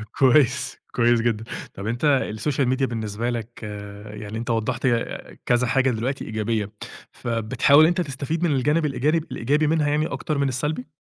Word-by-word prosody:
كويس، 135 0 +3
كويس 120 -1 +3
جدًا. 115 -2 0 0.3
طَب 100 +2 -6
أنت 130 +4 +2
الSocial 140 +2 0
Media 130 +1 -1
بالنسبة 115 -2 -2
لك 120 -1 -5 0.5
يعني 105 +1 -6
أنت 115 +1 -5
وضّحت 115 +3 -1
ه 120 -2 +3 0.4
كذا 120 0 +2
حاجة 130 +1 +3
دلوقتي 125 +4 -2
إيجابية، 110 -1 -2 0.4
فبتحاول 120 +5 +3
إن 155 - +7
أنت 175 +1 +1
تستفيد 150 +3 -3
من 170 - +2
الجانب 150 +5 +2
الإيجابي- 150 +3 +1
الإيجابي 145 +6 +1
منها 155 -1 +2
يعني 150 +2 +1
أكتر 155 -3 -3
من 140 - +2
السلبي؟ 150 - -2
130 Hz, 165 wpm, -23 LUFS, 115-150 Hz, 0.5 s, إن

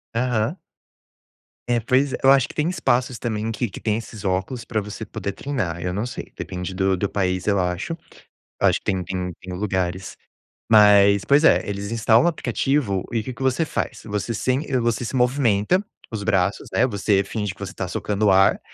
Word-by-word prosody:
Aham. 120 - 0 1.1
É, 120 -1 +2
pois 130 +4 +1
é, - - -1
eu 135 - +7
acho 135 -2 +4
que - - -11
tem 155 +2 0
espaços 130 -7 0
também, 110 -1 -2
que 115 +2 -2
que 95 - -9
tem 110 -1 0
esses 115 -2 -8
óculos 95 +6 -2
pra 115 -2 -2
você 105 +2 -6
poder 100 -2 -5
treinar, 95 -13 -3
eu 90 - -2
não 100 +5 -2
sei, 125 - -7
depende 90 0 -5
do 95 0 +2
do 100 +2 -2
país, 90 -2 -1
eu 100 -2 +3
acho, 90 - -2 0.6
acho - - +3
que - - -32
tem 95 -1 0
tem 90 0 -4
tem 95 -1 -8
lugares, 95 -1 -2 0.5
mas 100 -2 +6
pois 145 +3 +4
é, - - +5
eles 100 +1 -4
instalam 115 +1 +4
o - - +4
aplicativo 125 - 0
e 115 - +1
o - - -4
que 130 - -5
que 120 - -15
você 130 +5 +2
faz? - - -4
Você 105 +2 -3
sem 130 +6 0
eh, 130 -3 +1
você 120 0 0
se 120 - -5
movimenta, 125 - +2 0.3
os 110 -3 -4
braços, 100 -2 0
né, 120 - +3
você 100 -2 +1
finge 105 -1 -4
que - - -23
você 100 -1 -5
tá 95 - -4
socando 105 +3 -1
o - - +5
ar, 95 +1 +4
105 Hz, 205 wpm, -22 LUFS, 95-125 Hz, 1.1 s, eu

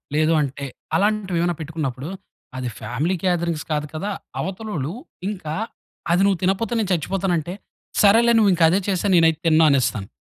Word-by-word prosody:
లేదు 155 +1 +3
అంటే 140 0 -3 0.3
అలాంటివేమైనా 190 -5 +1
పెట్టుకున్నప్పుడు 150 -2 -4 0.5
అది 125 -1 -3
ఫ్యామిలీ 150 +10 -1
గేదరింగ్స్ 170 -4 0
కాదు 150 0 -1
కదా. 195 +7 -3 0.3
అవతలోళ్ళు 185 -6 -4 0.4
ఇంకా 170 -7 -5 0.6
అది 175 +2 +3
నువ్వు 195 -2 +3
తినకపోతే 195 +5 0
నేను 210 -3 -1
చచ్చిపోతానంటే, 175 0 -1 0.5
సరేలే! 230 +3 +6
నువ్వు 210 -3 +5
ఇంకా 170 - +2
అదే 185 - +3
చేసేయి 195 0 +1
నేనైతే 165 -2 +4
తినను 160 0 +5
అనేస్తాను. 120 -8 +1
170 Hz, 140 wpm, -22 LUFS, 155-195 Hz, 0.6 s, సరేలే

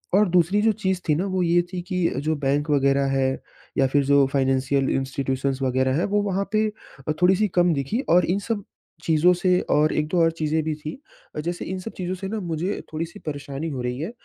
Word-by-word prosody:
और 205 -1 +4
दूसरी 180 +4 +3
जो 225 - +5
चीज़ 190 -1 0
थी 150 - +4
ना 175 +6 -1
वो 185 - +2
ये 175 0 +3
थी 180 - -3
कि 180 -2 +2
जो 155 +3 0
बैंक 145 +1 0
वग़ैरह 140 -1 +3
है 130 0 +2 0.5
या 135 - +4
फिर 140 +1 +2
जो 140 0 +5
फाइनेंशियल 135 0 +1
इंस्टीट्यूशंस 135 0 -2
वग़ैरह 130 +1 +1
है - - +1
वो 205 - +4
वहाँ 200 0 -1
पे 215 0 +3 0.4
अ, - - +2
थोड़ी 185 +1 +5
सी 215 +3 +2
कम 175 -1 +4
दिखी 145 - -1
और 175 +1 +5
इन 185 +3 0
सब 210 -3 -1 0.4
चीज़ों 165 +2 +4
से 180 0 +2
और 150 +1 +3
1-2 155 +4 0
और 165 0 +4
चीजें 160 -1 -1
भी 155 0 -1
थी। 155 0 -6 0.5
जैसे 175 0 -3
इन 185 +1 -4
सब 205 +5 -7
चीज़ों 185 0 -3
से 190 +1 -6
ना 220 +1 -3
मुझे 175 +1 -3
थोड़ी-सी 165 +5 -5
परेशानी 145 +1 -4
हो 130 -4 -4
रही 125 +1 -3
है। 165 +8 -4
160 Hz, 220 wpm, -24 LUFS, 140-180 Hz, 0.5 s, जो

